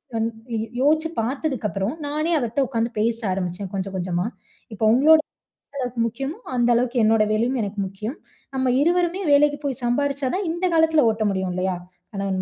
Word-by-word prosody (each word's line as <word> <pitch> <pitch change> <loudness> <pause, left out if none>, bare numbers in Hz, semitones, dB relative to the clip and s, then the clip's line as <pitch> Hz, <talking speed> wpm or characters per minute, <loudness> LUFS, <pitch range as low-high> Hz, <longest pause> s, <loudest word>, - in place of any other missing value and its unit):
வந் 225 0 +1 0.3
யோ - - -1 0.2
யோசிச்சுப் 315 +3 +2
பார்த்ததுக்கு 265 -1 -2
அப்புறம் 195 +7 -2
நானே 305 +3 -1
அவர்கிட்ட 255 +2 0
உட்கார்ந்து 230 -2 -1
பேச 225 +1 +1
ஆரம்பிச்சேன் 185 +1 -3
கொஞ்சம் 195 0 -3
கொஞ்சமா. 180 +1 -1 0.5
"இப்ப 215 - -20
உங்களோட 310 +6 +6 0.6
எவ்வளவுக்கு 250 -3 -2
முக்கியமோ 270 +7 -5 0.2
அந்த 240 0 +3
அளவுக்கு 245 +1 +1
என்னோட 220 0 +4
வேலையும் 240 +4 +1
எனக்கு 205 0 -5
முக்கியம். 215 - -6 0.4
நம்ம 260 0 +1
இருவருமே 350 +3 +2
வேலைக்கு 290 0 +4
போய் 270 -2 -3
சம்பாரிச்சாதான் 280 +7 0
இந்த 345 +3 -2
காலத்துல 320 -5 +4
ஓட்ட 220 0 -2
முடியும் 190 -1 -2
இல்லையா? 185 0 -1 0.4
கணவன் 195 -1 -2
240 Hz, 160 wpm, -23 LUFS, 205-290 Hz, 0.6 s, உங்களோட